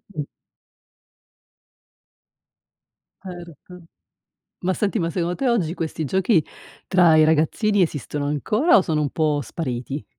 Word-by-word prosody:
Mh. 150 - -2 3.0
Certo. 175 -1 -11 0.8
Ma 185 +1 0
senti, 210 +3 -1
ma 170 -2 -1
secondo 175 +1 -2
te 270 - -2
oggi 185 -9 0
questi 160 -2 -4
giochi 190 - +2 0.4
tra 175 -4 +5
i 155 - +6
ragazzini 160 +7 +2
esistono 150 -3 -2
ancora 210 - +2
o - - +4
sono 160 -4 -1
un 145 - -1
po' 150 -1 0
spariti? 135 0 -5
170 Hz, 120 wpm, -22 LUFS, 150-185 Hz, 3.0 s, i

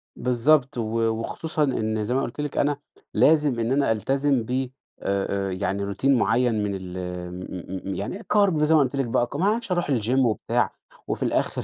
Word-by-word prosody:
بالضبط 125 +2 +2
و 115 - 0 0.3
وخصوصًا 150 +7 -2
إن 110 -5 0
زي 120 +4 -1
ما 135 - +2
قُلت 135 +3 -4
لِك 145 -2 -4
أنا، 145 0 +2 0.4
لازم 150 -5 +4
إن 115 +2 0
أنا 140 -4 +2
ألتزم 135 +3 +1
ب 130 +2 -2 0.4
آآ، 100 0 0
آآ، - - -3
يعني 100 +2 -2
Routine 100 - -6
معيّن 120 -3 +3
من 100 -1 -1
ال 95 -1 -7
آمم 90 0 -5 0.4
م 100 - -3
م - - -3
يعني 185 - -5
كارب، 195 -7 +4
زي 160 +1 +4
ما - - +6
قُلت 135 +1 0
لِك 135 - 0
بقى 120 +1 +1
ك 140 - -10
ما 175 +6 +1
أعرفش 220 0 0
أروح 175 -5 0
الGym 125 +5 +1
وبتاع، 115 -5 +1 0.3
وفي - - -2
الآخر - - 0
125 Hz, 200 wpm, -25 LUFS, 105-145 Hz, 0.4 s, ما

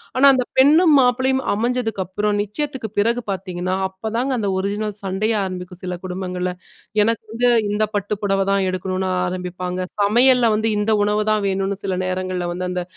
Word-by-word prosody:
ஆனா 260 +2 +4
அந்த 255 -1 +1
பெண்ணும் 305 +4 +6
மாப்பிளையும் 260 +1 +2
அமைஞ்சதுக்கப்புறம் 210 -3 -1
நிச்சயத்துக்கு 250 +2 -4
பிறகு 235 +3 +1
பாத்தீங்கன்னா, 185 -1 -3
அப்பதாங்க 225 +7 -2
அந்த 205 -2 -1
ஒரிஜினல் 205 +2 -2
சண்டையே 210 +3 0
ஆரம்பிக்கும் 180 -1 -6
சில 180 -1 -4
குடும்பங்கள்ல 180 0 -3 0.5
"எனக்கு 230 +1 0
வந்து 245 +1 +2 0.2
இந்த 215 +1 +1
பட்டு 205 +1 -1
புடவ 195 -1 +1
தான் 195 -1 +2
எடுக்கணும்னு" 185 0 -2 0.2
ஆரம்பிப்பாங்க. 180 0 -4 0.2
சமையல்ல 240 +3 +4
வந்து, 220 +1 0
"இந்த 210 +2 +1
உணவ 210 0 +1
தான் 210 -1 0
வேணும்னு" 195 +1 -1
சில 185 -2 -1
நேரங்கள்ல 185 -1 -2
வந்து 180 +1 -3
அந்த 180 -1 -2
200 Hz, 155 wpm, -21 LUFS, 185-230 Hz, 0.5 s, பெண்ணும்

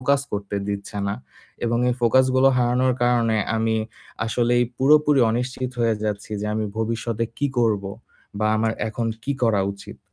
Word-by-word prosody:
Focus 140 +1 +2
করতে 100 0 -3
দিচ্ছে 100 0 -4
না। 100 - -1 0.5
এবং 120 0 +1
এই 125 - +1
ফোকাস 130 +2 +4
গুলো 130 +1 +5
হারানোর 125 +1 +2
কারণে, 120 -2 +2 0.2
আমি 110 0 +1 0.5
আসলেই 120 +1 +2
পুরোপুরি 150 0 +4
অনিশ্চিত 125 +2 -2
হয়ে 115 -1 +2
যাচ্ছি 105 0 -3
যে 105 - -3
আমি 110 - -1
ভবিষ্যতে 115 0 -1
কী 145 - +1
করব? 105 -4 +2 0.5
বা 110 - +1
আমার 110 0 +1 0.2
এখন 115 +1 -3 0.2
কী 140 - 0
করা 110 -4 +3
উচিত? 100 - -12
115 Hz, 160 wpm, -23 LUFS, 110-125 Hz, 0.5 s, গুলো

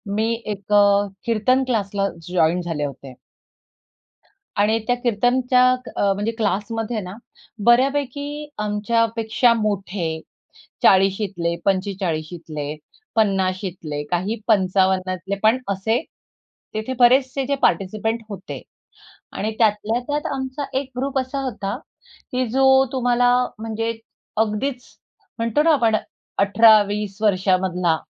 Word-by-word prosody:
मी 220 +2 +1
एक 205 -1 -4
अ, 205 0 +5 0.2
कीर्तन 235 +3 +2
क्लासला 200 -4 0 0.2
जॉइन 175 0 +2
झाले 160 -4 -3
होते. 135 -1 -8 1.4
आणि 210 +2 +3
त्या 245 - +3
कीर्तनच्या 245 +2 +2 0.3
अ, 200 - +2
म्हणजे 205 +3 -2
क्लासमध्येना 210 -1 -2 0.5
बऱ्यापैकी 285 +4 +1
आमच्या 210 +2 +1
पेक्षा 230 +1 +3
मोठे 195 -7 -2 0.6
40शीतले, 190 -3 +3
45शीतले, 170 -6 -2 0.4
50शीतले, 185 -7 -1
काही 185 +6 0
55तले 190 -2 +1
पण 220 +3 +5
असे, 220 +6 0 0.7
तिथे 220 +4 -3
बरेचसे 260 +2 +4
जे 280 - 0
पार्टिसिपंट 215 +6 0
होते 195 -2 -7 0.7
आणि 215 - -2
त्यातल्या 220 +1 +2
त्यात 295 0 -1
आमचा 265 +2 -4
एक 270 -1 -6
ग्रुप 275 +1 -1
असा 265 +1 -2
होता, 205 -5 -3 0.6
की 255 0 0
जो 265 +2 +5
तुम्हाला 245 -1 +2 0.3
म्हणजे 225 +1 -2 0.4
अगदीच 225 +4 -1 0.6
म्हणतो 230 +5 +1
ना 325 +1 +4
आपण 230 -7 +3 0.4
18-20 205 -1 +4
वर्षामधला 185 -4 +2
210 Hz, 100 wpm, -21 LUFS, 190-245 Hz, 1.4 s, अ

